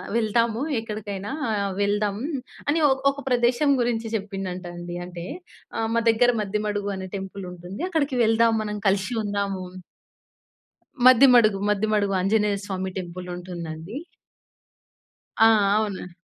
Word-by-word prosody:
వెళ్దాము, 230 +1 +1 0.2
ఎక్కడికైనా 210 -2 -5 0.5
వెళ్దాం." 205 0 +1 0.5
అని 320 +2 +2
ఒ - - +4 0.2
ఒక 285 +1 -8
ప్రదేశం 245 +3 +3
గురించి 230 -1 -1
చెప్పిండంటండి. 180 -4 -5
అంటే, 175 -1 -7 0.5
ఆహ్, 225 0 0
మా 230 - +3
దెగ్గర 245 +2 +3
మద్దెమడుగు 205 0 -2
అనే 190 0 -6
టెంపులుంటుంది. 190 - -7
అక్కడికి 285 -7 0
వెళ్దాం 225 +1 +4
మనం 210 0 -4
కలిషి 195 +4 0
ఉందాము 200 -2 -2 1.4
మద్దిమడుగు, 245 -5 +7
మద్దిమడుగు 210 -1 +1
ఆంజనేయ 205 +1 +2
స్వామి 190 -2 -3
టెంపులుంటుందండి. 175 0 -6 1.5
ఆ! 225 - +9 0.3
అవున 200 -4 -3
205 Hz, 105 wpm, -24 LUFS, 190-225 Hz, 1.5 s, ఆ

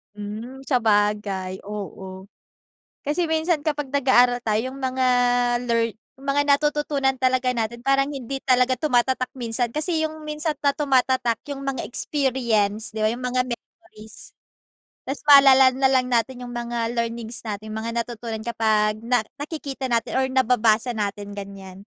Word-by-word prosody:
Hmm, 220 +6 -7
sabagay, 205 -6 0
oo 190 -2 -8 0.8
kasi 300 +5 0
minsan 320 -1 +1
kapag 295 -1 -2
nag 280 0 0
aaral 245 -1 +5
tayong 230 +5 -1
mga 260 -1 0 0.6
learn 230 -1 +1 0.3
yung 275 - -13
mga 285 +1 +3
natututunan 285 -1 +2
talaga 255 -1 +2
natin 235 0 -2
parang 275 0 +3
hindi 270 -1 -5
talaga 255 0 +3
tumatatak 255 -1 +1
minsan. 240 -1 -1
Kasi 315 +6 -1
yung 315 0 -4
minsan 305 0 -3
na 280 - +4
tumatatak 260 -4 +2 0.2
yung 275 - -7
mga 275 -2 -3
experience 235 -7 0
'di 220 -1 -3
ba, - - +4
yung 245 - -6
mga 250 0 0
memories. 235 -2 -10 0.7
Tas 270 +2 -4
maalala 270 -2 +8
na 270 - -2
lang 255 -1 +2
natin 245 +1 -1
yung 245 - -8
mga 235 -1 -3
learnings 230 0 -3
natin, 215 -1 -5
yung - - -3
mga 230 +1 -3
natutunan 230 -1 -5
kapag 215 -2 +1
na 245 0 +2 0.2
nakikita 290 -3 -6
natin 230 -2 0
or - - +2
nababasa 240 -2 +2
natin 205 -1 -4
ganyan. 195 -1 -9
245 Hz, 150 wpm, -23 LUFS, 220-275 Hz, 0.8 s, maalala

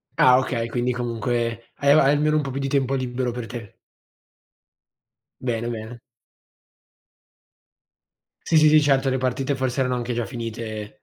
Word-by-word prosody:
Ah 125 0 +6
okay, 115 -3 -2
quindi 120 +2 -1
comunque 115 -1 -3
hai 140 0 +3
almeno 150 +1 +4
un - - +2
po' 135 - -4
più 135 - -4
di 135 - -1
tempo 135 -1 +1
libero 125 -1 -2
per 120 -1 -5
te. 115 -4 -9 1.6
Bene, 120 -2 -2
bene. 115 +1 -7 2.5
Sì, 165 - 0
sì, 155 0 +6
sì, 155 0 +6
certo 135 -2 +2
le 130 - 0
partite 130 +2 -1
forse 130 0 -1
erano 125 -1 0
anche 120 0 -3
già 120 -1 -2
finite. 110 -1 -6
125 Hz, 145 wpm, -23 LUFS, 115-135 Hz, 2.5 s, Ah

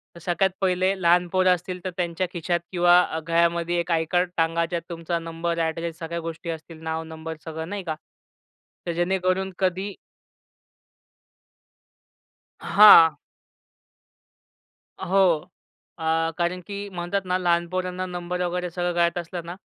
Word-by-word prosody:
तर - - -11
सगळ्यात 175 +3 +1
पहिले 185 0 +2
लहान 175 +1 +4
पोरं 185 +1 +3
असतील 180 +1 -7
तर - - -1
त्यांच्या 175 +1 -1
खिशात 175 0 -1
किंवा 175 -1 +5
अ, 160 - -3
गळ्यामध्ये 170 +1 +1
एक 170 +1 -2
आय-कार्ड 170 +2 +1
टांगा. 165 0 +2
ज्यात 170 0 -3
तुमचा 170 0 -3
नंबर, 165 +1 -3
ॲड्रेस, 165 0 -2
सगळ्या 170 0 -4
गोष्टी 165 0 -6
असतील, 160 0 -7
नाव, 160 0 -3
नंबर 160 0 -7
सगळं, 160 0 -6
नाही 200 -1 -4
का? 160 -3 -3 0.9
तर 175 - -1
जेणेकरून 185 +2 0
कधी 190 +1 -1 2.7
हां. 165 -7 +8 1.9
हो. 180 -4 +2 0.5
अ, 160 0 +1
कारण 175 +1 -1
की 200 0 -5
म्हणतात 180 +1 -2
ना 180 0 +1
लहान 175 -1 +1
पोरांना 185 0 -3
नंबर 180 0 -4
वगैरे 180 0 -2
सगळं 175 +1 -2
कळत 170 0 +1
असलं 175 +1 -5
ना? 175 +1 -6
175 Hz, 135 wpm, -24 LUFS, 165-180 Hz, 2.7 s, हां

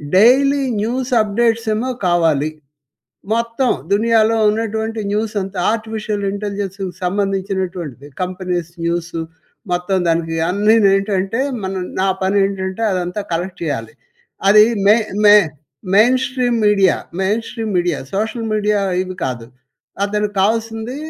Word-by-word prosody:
Daily 275 +7 +5 0.2
news 250 +3 -2
updates 225 +2 0
ఏమో 250 +4 -2 0.2
కావాలి. 160 -4 +2 0.9
మొత్తం 230 +2 0 0.2
దునియాలో 225 +1 +3
ఉన్నటువంటి 220 +1 -2
న్యూస్ 215 +1 -1
అంతా 190 0 -7
ఆర్టిఫిషియల్ 220 -2 -3
ఇంటెలిజెన్స్‌కి 200 -1 -4 0.2
సంబంధించినటువంటిది. 185 - -2
కంపెనీస్ 180 -2 -3
న్యూసు 170 0 -2 0.5
మొత్తం 180 +2 0
దానికి 165 0 0
అన్ని‌ను 210 +2 +4
ఏంటంటే 195 +3 -1 0.2
మన 190 - -3 0.3
నా 190 - +2
పని 190 +2 +1
ఏంటంటే 190 +1 -3
అదంతా 180 +2 -2
కలెక్ట్ 175 +3 -3
చేయాలి. 140 -8 -3 0.6
అది 210 +1 +8 0.2
మె 210 - +8 0.3
మె 205 0 +9 0.6
main 235 +5 +5
stream 250 -3 0
media 195 -3 +4 0.3
main 210 +4 +1
stream 225 -4 -4
media 175 -3 0 0.2
social 220 +2 -2
media 210 0 +1 0.2
ఇవి 185 0 -7
కాదు. 120 -3 -4 0.6
అతనికి 210 0 -2
కావాల్సింది 225 +4 -1
205 Hz, 115 wpm, -18 LUFS, 185-225 Hz, 0.9 s, మె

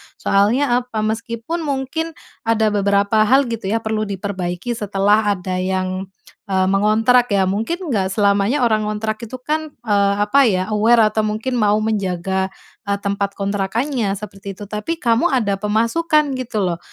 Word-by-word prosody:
Soalnya 240 +6 +2
apa, 245 -3 -4
meskipun 230 +8 -3
mungkin 305 +2 -3 0.3
ada 220 -2 +2
beberapa 200 +1 +2
hal 265 0 +3
gitu 225 -4 -4
ya, 225 +3 -1
perlu 215 -1 -1
diperbaiki 190 +1 -4
setelah 210 -1 +1
ada 185 0 -4
yang, 185 0 -2 0.4
e 195 - -2 0.2
mengontrak 220 +5 +3
ya. 200 -3 +2
Mungkin 250 - -2
enggak 195 -5 +1
selamanya 205 +5 +2
orang 215 -3 +2
ngontrak 215 0 -2
itu 230 +2 -7
kan, 310 0 -2
eee, 200 -2 +2
apa 270 +5 +4
ya, 185 -3 +1
aware 215 0 +4
atau 220 - -1
mungkin 230 +4 -2
mau 210 -1 +3
menjaga, 190 -3 -1 0.4
e - - -1
tempat 200 0 -2
kontrakannya 205 +3 -1
seperti 195 -1 -8
itu, 205 - -9
tapi 210 +11 -3
kamu 235 +2 +2
ada 215 - 0
pemasukan 280 +9 +1
gitu 230 -5 -2
loh. 175 -2 -1
215 Hz, 150 wpm, -19 LUFS, 200-240 Hz, 0.4 s, apa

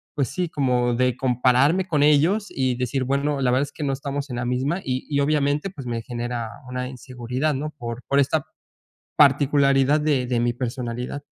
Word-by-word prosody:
pues 140 -5 0
sí, 180 -1 -2
como 125 -4 +1
de 125 0 +1
compararme 130 +8 +2
con 150 -4 +2
ellos, 160 +9 +3
y 130 -2 0
decir, 125 +2 -1
bueno, 140 +1 0
la 125 -2 +2
verdad 130 +2 +2
es 145 - -6
que 155 - -6
no 140 - 0
estamos 140 +1 -4
en 120 - -4
la 120 - -2
misma. 130 +8 -1
Y 130 0 -3
y 145 -1 0
obviamente, 145 +3 +1
pues, 140 -8 -9
me 115 -1 -2
genera 120 -1 -4 0.2
una 125 0 -3
inseguridad, 130 +3 -3
no 150 +3 -3
por 120 -1 -6
por 140 - +2
esta 140 +2 +1 0.7
particularidad 140 0 +4
de 145 -4 +1
de 120 -1 0
mi 120 0 +1
personalidad. 125 +2 -4
135 Hz, 190 wpm, -23 LUFS, 125-145 Hz, 0.7 s, particularidad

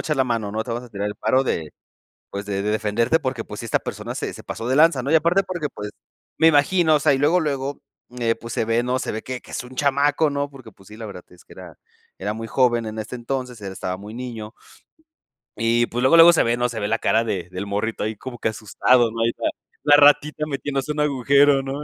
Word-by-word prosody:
echar 150 -2 -1
la 130 - +3
mano, 115 -4 -2
¿no? 110 +2 -3
Te 120 - -7
vamos 120 +2 -4
a - - -13
tirar 100 0 -3
el 105 - -4
paro 130 +1 +1
de, 80 - -2 0.6
pues, 100 +1 -6
de 100 -1 -2
de 105 - -1
defenderte, 110 +7 +1
porque 130 -6 -3
pues 105 -1 -9
sí 115 - -6
esta - - +1
persona - - -6
se - - -4
se - - -11
pasó 115 - -5
de 130 - +1
lanza, 155 -5 +5
¿no? 140 - -3
Y 160 - +6
aparte 170 +5 +3
porque 175 -6 -4
pues 105 0 -6 0.5
me 160 - +5
imagino 160 +2 +4
o 150 - +3
sea 150 -1 +4
y 135 - +1
luego, 160 +6 +3
luego, 140 -2 -3 0.4
eh, 115 -1 +1
pues, 115 0 -9
se - - 0
ve, 115 +2 +1
¿no? 125 +1 0
se - - -3
ve 110 - -4
que 130 -1 -5
que - - -17
es - - -4
un 130 +1 -12
chamaco, 145 +2 +2
¿no? 140 0 -2
Porque 130 -5 -13
pues, 95 -1 -21
sí 105 - -12
la 110 -1 -7
verdad 90 -3 -9
es 90 - -19
que - - -16
era - - -12 0.4
era 105 +2 -2
muy 115 0 -6
joven 120 -2 +2
en 110 0 -5
este 110 +4 -6
entonces, 125 -1 -4
él 95 -1 -5
estaba 90 -1 -4
muy 105 +3 -10
niño 115 -3 -7 1.0
y 115 +1 +2
pues 120 +1 -3
luego, 130 +6 +5
luego 170 +1 +9
se - - +3
ve, 115 +1 +1
¿no? 125 0 0
se 115 -2 -5
ve 105 - -1
la 115 - 0
cara 115 +1 +2
de 90 -6 -3
del 90 +2 -5
morrito 105 +3 -2
ahí 110 0 -2
como 120 +3 -8
que - - 0
asustado, 115 +2 +2
¿no? 115 0 -4
Ahí 115 - +3
está - - -7 0.4
la 145 0 +6
ratita 145 +1 +4
metiéndose 140 0 -3
en 150 - -4
un 150 - +3
agujero, 140 +1 +4
¿no? 135 +2 -5
120 Hz, 265 wpm, -22 LUFS, 110-140 Hz, 1.0 s, luego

